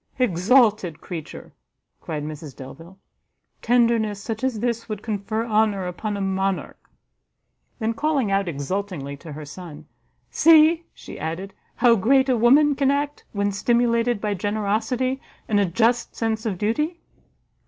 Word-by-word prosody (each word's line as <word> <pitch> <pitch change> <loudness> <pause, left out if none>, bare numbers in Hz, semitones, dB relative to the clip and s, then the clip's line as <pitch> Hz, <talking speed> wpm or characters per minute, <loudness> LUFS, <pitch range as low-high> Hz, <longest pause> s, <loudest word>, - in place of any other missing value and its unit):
"Exalted 215 - +3
creature!" 165 -4 -8 0.5
cried 155 -3 -4
Mrs 150 -2 -7
Delvile; 165 +8 -11 0.6
"tenderness 230 -3 +2
such 220 +3 -5
as 260 -4 0
this 235 0 -2
would 210 -1 -5
confer 215 +1 -2
honour 210 -4 +1
upon 200 +4 -4
a - - -3
monarch." 195 0 -2 0.9
Then, 225 -1 -1
calling 280 -4 0
out 195 -1 +1
exultingly 160 -1 -4
to 160 +2 -11
her 150 +1 -8
son, 155 0 -10 0.5
"See," 325 +1 +5
she - - -11
added, 175 +5 -5 0.2
"how 235 -1 +5
great 265 +7 +3
a 255 - +4
woman 275 +6 +5
can 275 -1 +1
act, 285 +1 -1
when 200 -1 0
stimulated 235 +2 +1
by 210 0 -1
generosity, 220 +6 -1 0.3
and 210 -3 +2
a 200 - +3
just 230 +7 +1
sense 225 -1 -2
of 195 -4 -2
duty! 300 - -1
215 Hz, 140 wpm, -23 LUFS, 190-245 Hz, 0.9 s, See